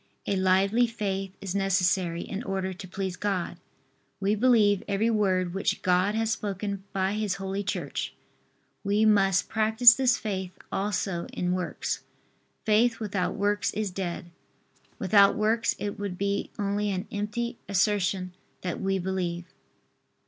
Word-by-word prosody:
A 200 - 0
lively 195 +5 +3
faith 195 -4 -3
is 195 -2 -4
necessary 185 -3 +1
in 200 - -5
order 190 -3 -2
to 185 +1 -9
please 190 0 -4
God. 195 -3 -2 0.6
We 200 +1 +1
believe 215 -3 +4
every 210 +3 +1
word 185 -5 +1
which 195 - -1
God 185 +3 +2
has 225 0 0
spoken 200 -2 -3
by 195 -1 0
His 210 -2 -1
Holy 195 +1 -3
Church. 195 - -3 0.7
We 205 +2 +2
must 195 -3 +4
practise 220 +2 +6
this 255 -2 +2
faith 190 -4 -4
also 195 -3 -1
in 180 0 -2
works. 180 -1 -3 0.6
Faith 225 +2 +3
without 200 -4 -2
works 205 +1 0
is 210 -2 -1
dead. 180 -1 -5 0.7
Without 200 +1 +5
works 215 0 +1
it 205 0 -4
would 200 -3 -4
be 200 +1 -1
only 205 0 0
an 185 -1 -3
empty 215 +3 -3
assertion 190 -2 +1 0.3
that 180 -2 -4
we 195 0 +1
believe. 175 -2 -2
195 Hz, 140 wpm, -27 LUFS, 185-210 Hz, 0.7 s, practise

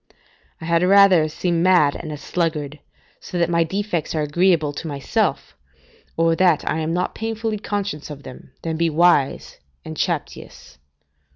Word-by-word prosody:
["I - - -8
had 170 0 +2
rather 185 -4 +5
seem 170 +2 -1
mad 175 -6 +4
and 155 - -7
a 150 - -5
sluggard, 150 -2 -3 0.4
so 180 - -7
that 170 0 +1
my 170 0 +3
defects 175 -2 -3
are 155 - 0
agreeable 155 -1 +1
to 160 - -6
myself, 140 -2 -2 0.6
or 165 0 +3
that 175 -5 +2
I 155 - 0
am 160 0 -2
not 180 +2 -1
painfully 225 -1 -3
conscious 200 -8 -4
of 145 -1 -9
them, 130 - -12
than 160 -1 -3
be 170 0 +1
wise, 160 -3 +1 0.3
and - - -7
chaptious." 65 0 -5
165 Hz, 160 wpm, -21 LUFS, 150-180 Hz, 0.6 s, rather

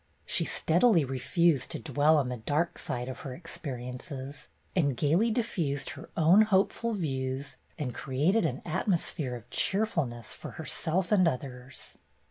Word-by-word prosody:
She - - +1
steadily 175 - +3
refused 135 +3 +1
to - - -4
dwell 150 +1 +3
on 135 -4 +1
the 125 - -3
dark 150 +9 -1
side 125 0 -3
of 130 - -6
her 135 -7 -6
ex 170 +3 -7
periences, 130 +1 -6 0.3
and 140 -8 +2
gayly 165 - +3
diffused 175 - -1
her - - -10
own 170 +6 +7
hopeful 215 +2 +2
views 135 -6 -3 0.2
and 135 -6 -3
created 150 - +1
an 130 -1 -5
atmosphere 170 - -1
of 120 -1 -10
cheerful 195 - +1
ness 120 -2 -7
for - - -8
herself 170 +3 -1
and 185 -4 +5
others. 130 -2 -4
150 Hz, 150 wpm, -29 LUFS, 130-175 Hz, 0.3 s, own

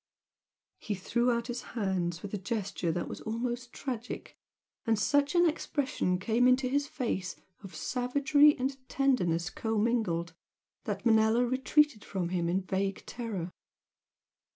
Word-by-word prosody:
He 210 - -3
threw 235 +6 0
out 235 -1 0
his 240 0 -4 0.2
hands 180 -5 -1
with 205 - -7
a - - 0
gesture 195 -3 -2
that 175 - -2
was - - -7
almost 240 +2 -3
tragic, 245 -3 -6 0.5
and 225 -1 +2
such 285 +8 +2
an 345 0 +6
expression 285 - -1
came 230 +6 +2
into 255 +1 +4
his 285 +2 0
face 195 -10 -3 0.3
of 195 -2 -10
savagery 285 +4 +3
and 265 +1 -1
tenderness 190 -11 +1
commingled 215 -7 0 0.5
that - - -3
Manella 220 +1 +4
retreated 265 0 +2
from 185 -3 -3
him 175 -2 0
in 185 +3 +1
vague 195 +1 -2
terror. 210 -8 -4
230 Hz, 135 wpm, -30 LUFS, 190-255 Hz, 0.5 s, an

